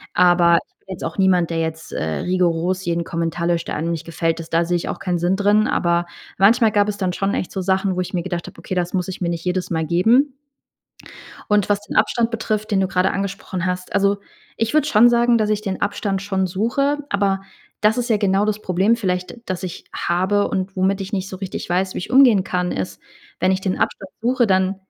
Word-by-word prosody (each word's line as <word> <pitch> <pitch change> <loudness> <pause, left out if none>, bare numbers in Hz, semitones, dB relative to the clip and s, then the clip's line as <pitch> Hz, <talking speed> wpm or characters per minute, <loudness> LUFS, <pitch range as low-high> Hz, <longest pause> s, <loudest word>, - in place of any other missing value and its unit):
Aber 175 -1 +5
ich - - -45
bin - - -40
jetzt - - -8
auch - - -4
niemand, 180 -3 +3
der 165 - -1
jetzt 160 0 -4
rigoros 180 - 0
jeden 170 0 0
Kommentar 170 0 -2
löscht, 170 -1 0
der - - -3
einem 165 +2 -2
nicht 165 -1 -4
gefällt. 165 0 -1
Ist 165 - -9
da 165 0 +3
sehe 175 - 0
ich - - -5
auch - - -3
keinen 180 -2 -1
Sinn 175 +3 +1
drin, 205 +2 +3
aber 170 -1 +1 0.3
manchmal 220 +2 +5
gab 205 0 +2
es 205 - -3
dann 185 -3 -1
schon 195 +2 -1
echt 185 - -3
so 190 - -3
Sachen, 190 0 +1
wo 185 - 0
ich 180 - -6
mir 175 - -1
gedacht 175 -2 -4
habe: - - -12
„Okay, - - -6
das 180 0 -1
muss 180 -2 -1
ich 185 - -7
mir 170 - 0
nicht 170 0 -4
jedes 180 0 -1
Mal 160 -2 -1
geben.” 235 - +3 1.2
Und 210 -2 +3
was 205 0 +1
den - - -8
Abstand 225 +2 +2
betrifft, 215 -1 -2
den 195 - +3
du 190 - +1
grade 185 0 +1
angesprochen 195 -2 -4
hast 180 0 -3
also, 200 0 +2 0.4
ich 225 - 0
würde 305 -1 +3
schon 235 0 +6
sagen, 235 0 +3
dass 215 -1 +1
ich 210 0 0
den 195 -3 -4
Abstand 200 -1 -1
schon 190 -1 -1
suche. 235 +10 0
Aber 195 -1 +1 0.4
das 215 +2 +3
ist 245 0 -2
ja 220 - +3
genau 200 0 +2
das 215 0 -1
Problem 190 +5 +2
vielleicht, 185 0 -2
das 185 0 -4
ich 180 -2 -6
habe 190 +4 +1
und 190 0 -3
womit 190 +1 +1
ich 195 +3 -7
nicht 190 -1 -1
so 185 - -7
richtig 190 -1 -5
weiß, 185 +2 0
wie - - -2
ich 180 - -7
umgehen 250 -8 +6
kann 180 -1 -1
ist 95 0 -4 0.4
wenn 185 +1 +3
ich 190 - -2
den 190 -1 -2
Abstand 195 -1 -2
suche, 245 +1 +2
dann 190 0 +2
190 Hz, 235 wpm, -21 LUFS, 175-205 Hz, 1.2 s, schon